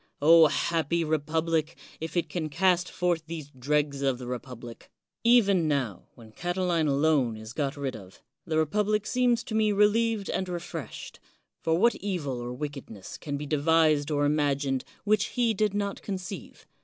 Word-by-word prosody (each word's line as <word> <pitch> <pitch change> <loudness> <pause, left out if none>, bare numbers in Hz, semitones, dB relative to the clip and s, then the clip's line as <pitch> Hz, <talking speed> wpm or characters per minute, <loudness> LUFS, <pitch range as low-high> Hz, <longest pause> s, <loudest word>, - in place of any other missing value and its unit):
happy 165 +2 0
republic, 160 +1 0 0.2
if 160 +2 -5
it 170 - +1
can 155 0 -3
cast 180 +3 +2
forth 175 -3 0
these 155 -3 -7
dregs 140 +2 -1
of 135 -2 +1
the 125 - -8
republic! 120 -1 -8 0.3
Even 200 -8 +4
now, 130 - -2
when 115 -2 -14
Catiline 175 - 0
alone 140 -5 +2
is 110 +1 -9
got 145 0 -2
rid 135 -2 -3
of, 95 -4 -12 0.2
the 160 -1 -2
republic 210 +6 +1
seems 245 -1 +2
to - - -7
me 215 -1 +3
relieved 210 +1 +2
and 185 - -2
refreshed; 170 -7 -6 0.4
for 160 0 +1
what 235 +6 +4
evil 160 -11 -3
or 120 0 -5
wickedness 130 -7 -7
can 145 -2 -4
be 150 - -5
devised 155 0 +3
or 145 -1 +1
imagined 140 -3 +1 0.2
which 215 0 +2
he 240 -2 +1
did 210 -1 0
not 200 -1 -2
conceive? 185 -4 -7
160 Hz, 155 wpm, -27 LUFS, 140-190 Hz, 0.4 s, Even